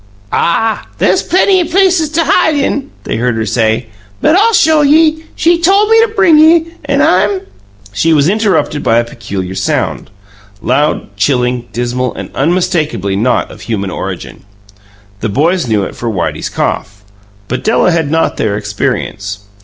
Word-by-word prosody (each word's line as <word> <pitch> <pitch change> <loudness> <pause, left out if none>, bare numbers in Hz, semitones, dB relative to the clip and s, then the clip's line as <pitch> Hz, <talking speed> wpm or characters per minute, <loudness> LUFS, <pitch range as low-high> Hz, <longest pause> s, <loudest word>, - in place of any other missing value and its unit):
"Ah, 220 +6 0
there's - - +2
plenty 375 0 +2
places 350 -2 +2
t'hide 320 0 +2
in," 280 0 -1
they - - -3
heard 120 0 0
her 110 0 -2
say; 110 +2 0 0.3
"but 320 - +3
I'll 445 +4 +3
show 315 -3 +4
ye! 315 +2 +3
She 340 0 +2
tole 395 +5 +4
me 450 0 +5
to 455 - +3
bring 385 -8 +3
ye, 325 +1 +4 0.2
and - - +1
I'm 390 -2 +2 0.2
" 100 0 -25
She 165 +12 +1
was 150 -2 +3
interrupted 200 -7 0
by 115 - +2
a 120 - +3
peculiar 100 -6 -6
sound - - -2 0.5
loud, 130 -4 -1
chilling, 125 +1 0
dismal, 120 +1 -2
and - - -7
unmistakably 155 - 0
not 120 +5 0
of - - -13
human 100 -4 -3
origin. - - -6 0.8
The 110 - -2
boys 165 - 0
knew 105 -3 +1
it - - -6
for 120 - -4
Whitey's 95 -6 -3
cough; 100 0 -3 0.4
but 125 - -4
Della 215 -4 +2
had 165 -4 0
not 165 +2 0
their 105 -2 -1
experience. 105 -1 -3
155 Hz, 160 wpm, -12 LUFS, -, 0.8 s, me